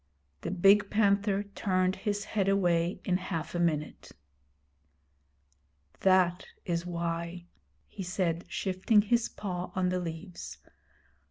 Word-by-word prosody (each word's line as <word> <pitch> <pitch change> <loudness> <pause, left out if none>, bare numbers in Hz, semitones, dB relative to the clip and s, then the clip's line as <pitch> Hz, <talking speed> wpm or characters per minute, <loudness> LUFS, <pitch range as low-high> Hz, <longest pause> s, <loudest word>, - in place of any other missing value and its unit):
The - - -3
big 195 +3 +5
panther 200 -1 +2
turned 185 -2 0
his 205 +1 -2
head 195 -3 0
away 175 -2 +1
in 180 -2 +2
half 170 -4 -4
a 175 - -1
minute. 155 -3 -1 1.9
'That 185 -2 +3 0.2
is 170 0 -2
why,' 170 0 -3 0.4
he 200 - -9
said, 175 -2 -1
shifting 195 +3 +2
his 235 +2 +1
paw 180 -3 -5
on 185 -1 +1
the 180 0 0
leaves. 165 - -7
185 Hz, 115 wpm, -30 LUFS, 170-200 Hz, 1.9 s, big